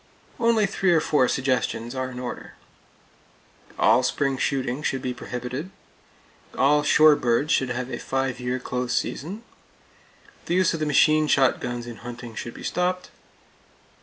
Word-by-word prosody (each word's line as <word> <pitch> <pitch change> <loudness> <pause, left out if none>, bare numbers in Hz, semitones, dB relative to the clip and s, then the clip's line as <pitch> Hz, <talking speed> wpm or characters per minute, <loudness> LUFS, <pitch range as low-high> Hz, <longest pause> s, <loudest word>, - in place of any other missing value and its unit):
Only 230 -2 +3
three 195 -1 +1
or 165 - +5
four 145 -4 +2
suggestions 125 -3 -1
are 130 -1 -3
in 125 - -9
order: 125 -1 -7 1.2
All - - +4
spring 135 +1 0
shooting 135 0 -1
should 135 -3 -2
be 125 - -2
prohibited. 125 +6 -6 0.9
All 150 +2 +4
shore 150 0 +6
birds 125 +4 0
should 130 - +2
have 125 +1 -4
a - - -4
five 135 -1 -2
year 125 +1 -2
close 125 -1 -3
season. 195 - -4 1.0
The 175 - 0
use 185 -1 +3
of 165 - -3
the 155 - -1
machine 155 +1 +4
shotguns 125 -3 +1
in 120 -2 -8
hunting 120 -1 -9
should 120 +1 -7
be - - -10
stopped. 180 +1 -2
130 Hz, 150 wpm, -24 LUFS, 125-155 Hz, 1.2 s, shore